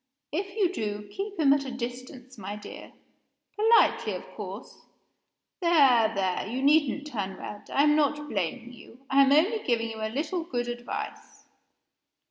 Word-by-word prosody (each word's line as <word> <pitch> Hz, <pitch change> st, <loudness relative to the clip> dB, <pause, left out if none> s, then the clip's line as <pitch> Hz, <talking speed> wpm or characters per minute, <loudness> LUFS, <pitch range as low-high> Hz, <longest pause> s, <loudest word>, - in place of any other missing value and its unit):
If 390 Hz, +5 st, -3 dB
you 375 Hz, -4 st, +2 dB
do, 210 Hz, -, -4 dB
keep 400 Hz, 0 st, -5 dB
him 280 Hz, -3 st, +6 dB
at 285 Hz, -1 st, 0 dB
a 270 Hz, -, -6 dB
distance, 250 Hz, +1 st, -7 dB
my 205 Hz, -1 st, -6 dB
dear 210 Hz, -, -10 dB, 0.6 s
politely, 450 Hz, +2 st, +4 dB
of -, -, -6 dB
course. -, -, -8 dB, 0.8 s
There! 275 Hz, -, +5 dB
there! 190 Hz, -1 st, -1 dB
you 250 Hz, +5 st, -3 dB
needn't 290 Hz, -1 st, +3 dB
turn 200 Hz, -9 st, -4 dB
red; 205 Hz, -, -9 dB
I 280 Hz, -, +3 dB
am 300 Hz, 0 st, +4 dB
not 295 Hz, 0 st, +1 dB
blaming 230 Hz, -, -3 dB
you; 250 Hz, +2 st, -16 dB
I 275 Hz, +1 st, +6 dB
am 270 Hz, -, +3 dB
only 360 Hz, +10 st, +4 dB
giving 230 Hz, -, -1 dB
you 220 Hz, -, -8 dB
a 220 Hz, -, -1 dB
little 310 Hz, +8 st, -2 dB
good 245 Hz, -6 st, -3 dB
advice. 240 Hz, 0 st, -6 dB
265 Hz, 160 wpm, -27 LUFS, 230-305 Hz, 0.8 s, him